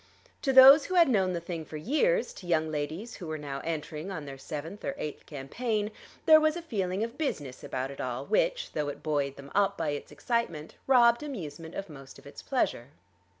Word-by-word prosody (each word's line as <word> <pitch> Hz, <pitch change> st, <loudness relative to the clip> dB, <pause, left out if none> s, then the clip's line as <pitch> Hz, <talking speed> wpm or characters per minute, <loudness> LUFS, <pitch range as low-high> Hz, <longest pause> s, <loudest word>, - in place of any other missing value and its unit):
To 270 Hz, -, +1 dB
those 270 Hz, +3 st, +9 dB
who 370 Hz, -, -3 dB
had 340 Hz, -2 st, +7 dB
known 190 Hz, -7 st, +2 dB
the 170 Hz, -, -1 dB
thing 170 Hz, -1 st, -5 dB
for 155 Hz, 0 st, -8 dB
years, 460 Hz, -, +1 dB
to 180 Hz, -, -11 dB
young 160 Hz, -2 st, +1 dB
ladies 155 Hz, +10 st, -4 dB
who 180 Hz, -, -8 dB
were 155 Hz, 0 st, -3 dB
now 140 Hz, -2 st, -5 dB
entering 160 Hz, +1 st, -4 dB
on 160 Hz, -6 st, -5 dB
their 135 Hz, -1 st, -7 dB
seventh 155 Hz, +7 st, -7 dB
or 280 Hz, -, -3 dB
eighth 150 Hz, -, -6 dB
campaign, 210 Hz, -, -2 dB, 0.3 s
there 315 Hz, -1 st, +9 dB
was 310 Hz, 0 st, +2 dB
a 345 Hz, -, -4 dB
feeling 195 Hz, -, -2 dB
of 230 Hz, +5 st, -6 dB
business 145 Hz, -, -3 dB
about 130 Hz, +1 st, -3 dB
it 140 Hz, -, -7 dB
all 130 Hz, +1 st, -3 dB
which, -, -, +1 dB
though 150 Hz, -1 st, -2 dB
it 145 Hz, -, -8 dB
buoyed 145 Hz, -3 st, -1 dB
them 140 Hz, 0 st, -12 dB
up 200 Hz, 0 st, +2 dB
by 160 Hz, -2 st, -1 dB
its 145 Hz, 0 st, -5 dB
excitement, 165 Hz, -1 st, -2 dB
robbed 240 Hz, -2 st, +5 dB
amusement 165 Hz, -, -7 dB
of 195 Hz, -, -4 dB
most 135 Hz, -4 st, -12 dB
of -, -, -17 dB
its 140 Hz, -, -10 dB
pleasure. 190 Hz, -, -1 dB
170 Hz, 210 wpm, -29 LUFS, 145-245 Hz, 0.3 s, those